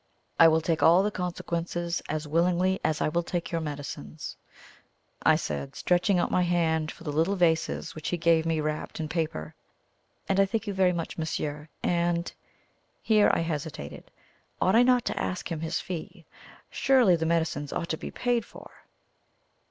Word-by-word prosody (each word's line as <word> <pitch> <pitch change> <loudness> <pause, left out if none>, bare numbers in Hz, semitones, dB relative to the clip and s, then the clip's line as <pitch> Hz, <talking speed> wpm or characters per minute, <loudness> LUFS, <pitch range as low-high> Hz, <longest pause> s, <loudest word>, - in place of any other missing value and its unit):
"I 165 - +9
will 160 0 +4
take 160 0 0
all 175 +4 +6
the 210 - 0
consequences 175 -1 -3
as 155 0 -3
willingly 180 +4 +2
as 155 -1 0
I - - +2
will 170 +2 0
take 170 0 -4
your 165 -1 -1
medicines," 140 - -6 0.9
I - - +5
said, 70 -2 -4
stretching 180 +2 +2
out 175 - 0
my 180 - +3
hand 165 -3 +1
for - - -13
the 150 - -3
little 165 +7 +1
vases 165 -3 +1
which 155 - -5
he 175 - -1
gave 165 -1 +3
me 165 -1 0
wrapped 155 +1 -4
in 155 - -2
paper. 155 - -3 0.7
"And 195 0 +1
I 195 - +5
thank 225 +1 -2
you 205 - -3
very 190 -1 +3
much, 170 -1 -4
monsieur. 150 -1 -3
And" 170 0 0 0.7
here 215 -2 +4
I - - +1
hesitated. 155 - -5 0.5
Ought 190 - +3
I 235 - +7
not 250 -1 +4
to - - -2
ask 185 0 -3
him 165 - -2
his 165 +1 -2
fee? 170 0 -7 0.5
Surely 250 -9 +4
the 160 -1 -1
medicines 160 -4 0
ought 170 - -3
to - - 0
be - - -6
paid 245 -2 0
for? - - -13
170 Hz, 175 wpm, -27 LUFS, 155-180 Hz, 0.9 s, I